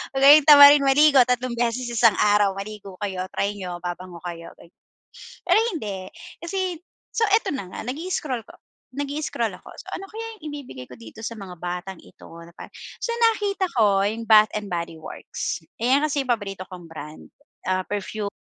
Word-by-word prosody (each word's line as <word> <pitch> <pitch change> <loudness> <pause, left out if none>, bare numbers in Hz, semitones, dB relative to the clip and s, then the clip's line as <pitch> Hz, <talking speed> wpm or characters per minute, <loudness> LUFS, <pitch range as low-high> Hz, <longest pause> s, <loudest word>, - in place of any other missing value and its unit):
wag 270 - 0
kayong 295 +2 +9
tamaring 285 -1 +9
maligo 275 0 +6
3 250 0 -1
beses 240 +1 -1
isang 230 -3 +4
araw 205 -1 +4
maligo 200 -1 -8
kayo 190 -3 -3
try 200 - 0
n'yo 180 -3 -6
babango 175 0 -6
kayo 170 -1 -7
gan - - -15 0.8
pero - - +3 0.2
hindi 200 - -5 0.4
kasi, 370 0 -2 0.3
so 455 - 0
eto 435 - +3
na 260 -8 -4
nga - - -6
nag-i-scroll 280 -4 -3
ko, - - -15 0.4
nag-i-scroll 285 +2 -2
ako - - -16
so - - -12
ano 390 - -8
kaya 450 +1 -6 0.2
yung 300 - -5
ibibigay 245 - -9
ko - - -11
dito 115 - -12
sa 230 - -4
mga 185 -3 -9
batang 180 +1 -5
ito - - -16 0.2
na 170 - -16
pa - - -10 0.3
so - - -3 0.2
nakita 405 -3 -1
ko 200 -4 +3
yung 225 +3 -3
Bath 215 -1 +7
and 210 -1 -4
Body 170 -1 -4
Works, - - -6 0.2
ayan 260 +5 +3
kasi 290 -2 0
yung - - -14
paborito 200 -5 -3
kong 180 -2 -10
brand, 155 -1 -10 0.4
ah, 185 0 +1
perfume, 205 0 -3
215 Hz, 180 wpm, -23 LUFS, 185-285 Hz, 0.8 s, kayong